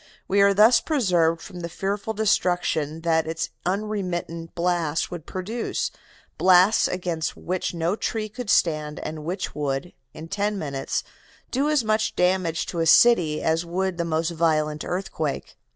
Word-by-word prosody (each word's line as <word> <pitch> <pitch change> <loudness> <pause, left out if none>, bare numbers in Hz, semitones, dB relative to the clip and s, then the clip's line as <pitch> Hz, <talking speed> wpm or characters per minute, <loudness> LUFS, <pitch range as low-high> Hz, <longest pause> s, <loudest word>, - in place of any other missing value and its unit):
We 200 +1 +3
are 200 0 +6
thus 215 +4 +6
preserved 175 - +1
from 180 - -9
the 170 -1 -5
fearful 200 +5 -3
destruction 175 -7 0
that 160 -1 +1
its 165 0 -3 0.2
unintermittent 180 -4 -3
blasts 170 -3 0
would 175 -4 -7
produce, 210 +6 -3 0.5
blasts 185 +3 +5
against 175 -3 -3
which 180 0 -3
no 170 +3 0
tree 220 -1 -2
could 240 +1 -7
stand 155 -5 +1
and 155 -1 -6
which 180 +4 -4
would, 145 +3 -3 0.2
in 160 +1 -9
ten 205 +3 -1
minutes, 140 -6 -3 0.5
do 275 +4 +1
as 300 -5 +2
much 215 0 0
damage 180 -2 +1
to 170 - -5
a 165 - +1
city 165 -5 +5
as 160 +1 +1
would 180 +1 -2
the - - +1
most 165 0 -1
violent 155 -2 0
earthquake. 160 -5 -3
175 Hz, 150 wpm, -24 LUFS, 160-200 Hz, 0.5 s, are